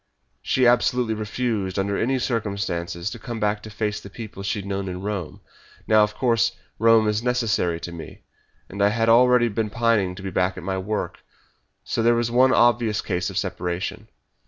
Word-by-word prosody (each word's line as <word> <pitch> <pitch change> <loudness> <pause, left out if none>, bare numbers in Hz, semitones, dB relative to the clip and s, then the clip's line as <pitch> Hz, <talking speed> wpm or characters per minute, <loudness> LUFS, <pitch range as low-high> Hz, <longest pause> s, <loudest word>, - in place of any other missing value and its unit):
She 130 - +1
absolutely 120 -1 +3
refused, 105 -3 -2
under 100 +1 0
any 130 +5 +1
circumstances, 100 -7 -2
to - - -8
come 120 -3 -6
back 105 0 0
to 110 - -9
face 105 0 -3
the 100 - -10
people 105 -1 -9
she 100 +2 -2
had 100 - -6
known 100 -1 -3
in 90 +1 -6
Rome. 100 -6 -4 0.5
Now, 110 -1 +5
of 105 0 +1
course, 115 -1 +2 0.3
Rome 115 -1 +5
is 105 +1 0
necessary 115 -9 0
to 85 - -6
me, 85 -2 -10 0.4
and 100 +1 -6
I 105 +2 +3
was 115 0 +2
already 125 +1 +5
pining 110 -3 0
to 95 - -10
be 95 - -4
back 90 +1 0
at 95 - -7
my 95 +1 -2
work 105 +3 -3 0.6
so - - -2
there 120 +1 +4
was 115 0 0
one 130 +2 +5
obvious 120 -4 +3
cause 90 -2 -2
of - - -6
separation. 90 0 -3
105 Hz, 185 wpm, -23 LUFS, 95-115 Hz, 0.6 s, Now